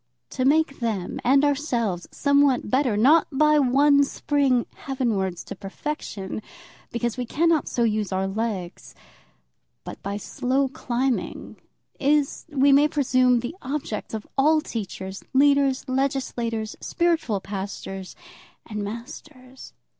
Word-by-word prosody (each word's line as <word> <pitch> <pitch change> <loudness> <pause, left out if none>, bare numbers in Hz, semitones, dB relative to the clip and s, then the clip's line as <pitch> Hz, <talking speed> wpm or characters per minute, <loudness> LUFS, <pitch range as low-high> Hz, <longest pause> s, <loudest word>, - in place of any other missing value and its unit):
To 255 - -1
make 295 0 +2
them 215 -7 -2
and 275 +3 +4
ourselves 240 - -1
somewhat 280 -6 +2
better, 255 -5 +2
not 295 +9 +5
by 300 +2 +4
one 280 +2 +4
spring 275 -3 +1
heavenwards 215 -10 -2
to - - -8
perfection, 200 -2 -5 0.5
because 235 0 -2
we 250 - -2
cannot 330 +3 +2
so 240 - 0
use 215 -3 0
our 190 0 0
legs, 195 -3 -4 0.9
but - - -9
by 200 +1 -3
slow 265 +4 -1
climbing, 255 -1 -2 0.4
is, 285 0 +1
we 280 -1 +3
may 285 +2 +6
presume, 255 -4 +2
the 245 +7 -5
object 260 -6 -4
of 215 - -6
all 310 +3 +5
teachers, 195 - -6
leaders, 280 -1 +3
legislators, 255 -4 -2
spiritual 330 - 0
pastors, 195 -1 -6 0.5
and 210 -2 -5
masters. 255 +4 -9
255 Hz, 120 wpm, -24 LUFS, 215-285 Hz, 0.9 s, may